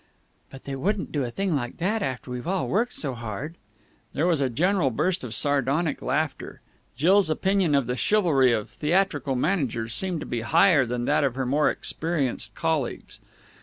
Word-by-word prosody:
"But 135 Hz, -, -12 dB
they 140 Hz, -, -5 dB
wouldn't 195 Hz, +8 st, -2 dB
do 145 Hz, -3 st, -1 dB
a -, -, -4 dB
thing 190 Hz, +6 st, -1 dB
like 120 Hz, -4 st, -3 dB
that 210 Hz, +6 st, 0 dB
after 130 Hz, -, -4 dB
we've 125 Hz, +4 st, -5 dB
all 190 Hz, +1 st, 0 dB
worked 230 Hz, +5 st, 0 dB
so 140 Hz, -4 st, -1 dB
hard!" 115 Hz, +6 st, -6 dB, 0.6 s
There 155 Hz, -, 0 dB
was 170 Hz, -5 st, +2 dB
a 135 Hz, -, +1 dB
general 175 Hz, -, +1 dB
burst 175 Hz, +8 st, -1 dB
of 115 Hz, -3 st, -4 dB
sardonic 145 Hz, +4 st, 0 dB
laughter. 145 Hz, +3 st, -2 dB, 0.4 s
Jill's 180 Hz, +6 st, +4 dB
opinion 190 Hz, -1 st, +1 dB
of 140 Hz, -3 st, +2 dB
the 125 Hz, +1 st, -2 dB
chivalry 150 Hz, -, +3 dB
of 110 Hz, -3 st, -1 dB
theatrical 150 Hz, -5 st, 0 dB
managers 125 Hz, -, -1 dB
seemed 180 Hz, -1 st, -2 dB
to -, -, -5 dB
be 120 Hz, -, -3 dB
higher 150 Hz, +2 st, +4 dB
than 120 Hz, 0 st, -2 dB
that 145 Hz, +2 st, +2 dB
of 135 Hz, -3 st, 0 dB
her 130 Hz, -1 st, -2 dB
more 145 Hz, +4 st, +2 dB
experienced 155 Hz, -6 st, -1 dB
colleagues. 160 Hz, -6 st, -2 dB
145 Hz, 180 wpm, -25 LUFS, 125-175 Hz, 0.6 s, Jill's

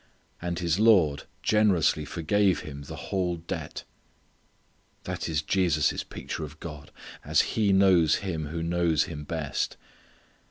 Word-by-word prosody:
And 85 Hz, 0 st, -3 dB
his 85 Hz, 0 st, 0 dB
lord 90 Hz, -11 st, +4 dB, 0.2 s
generously 95 Hz, -8 st, +3 dB
forgave 95 Hz, +3 st, +1 dB
him 70 Hz, -2 st, -8 dB
the -, -, -7 dB
whole 90 Hz, -3 st, -2 dB
debt. 85 Hz, +1 st, -6 dB, 1.2 s
That -, -, -4 dB
is 80 Hz, -1 st, 0 dB
Jesus' 80 Hz, -4 st, +1 dB
picture -, -, -6 dB
of 75 Hz, 0 st, -9 dB
God, 75 Hz, -3 st, -8 dB, 0.3 s
as -, -, +3 dB
He 105 Hz, -3 st, +2 dB
knows 95 Hz, -5 st, +5 dB
Him 80 Hz, -6 st, -3 dB
who 80 Hz, +2 st, -4 dB
knows 85 Hz, -2 st, +2 dB
Him 75 Hz, -3 st, -7 dB
best. 75 Hz, -2 st, -3 dB
85 Hz, 130 wpm, -27 LUFS, 75-95 Hz, 1.2 s, knows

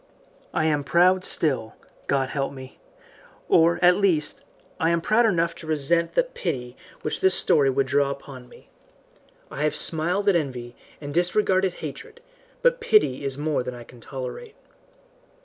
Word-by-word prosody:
I 155 Hz, -, 0 dB
am 150 Hz, -2 st, +1 dB
proud 180 Hz, +5 st, +3 dB
still 130 Hz, -12 st, -1 dB, 0.3 s
God 135 Hz, -1 st, 0 dB
help 135 Hz, -1 st, -2 dB
me! 130 Hz, -1 st, -12 dB, 0.7 s
or, 170 Hz, +1 st, +4 dB
at 180 Hz, 0 st, +6 dB
least, 180 Hz, -7 st, +1 dB, 0.4 s
I 165 Hz, -1 st, +2 dB
am 170 Hz, 0 st, +2 dB
proud 220 Hz, +7 st, +3 dB
enough 170 Hz, -4 st, +1 dB
to 160 Hz, -, -11 dB
resent 160 Hz, +2 st, 0 dB
that -, -, +1 dB
pity 125 Hz, -8 st, -4 dB, 0.3 s
which 150 Hz, -, -3 dB
this 190 Hz, -1 st, +4 dB
story 140 Hz, -2 st, +3 dB
would 135 Hz, +1 st, +1 dB
draw 140 Hz, +1 st, +1 dB
upon 135 Hz, -2 st, -9 dB
me. -, -, -19 dB, 0.8 s
I -, -, -6 dB
have 150 Hz, 0 st, 0 dB
smiled 175 Hz, +5 st, +1 dB
at 200 Hz, -, +4 dB
envy, 125 Hz, -6 st, -3 dB, 0.2 s
and 145 Hz, -1 st, -7 dB
disregarded 185 Hz, +1 st, +1 dB
hatred, 465 Hz, 0 st, -9 dB, 0.4 s
but -, -, +3 dB
pity 425 Hz, -, +2 dB
is 135 Hz, -1 st, -2 dB
more 150 Hz, -1 st, -1 dB
than 125 Hz, 0 st, -6 dB
I 120 Hz, -, -10 dB
can 120 Hz, +1 st, -16 dB
tolerate. 140 Hz, -, -7 dB
155 Hz, 160 wpm, -24 LUFS, 135-185 Hz, 0.8 s, at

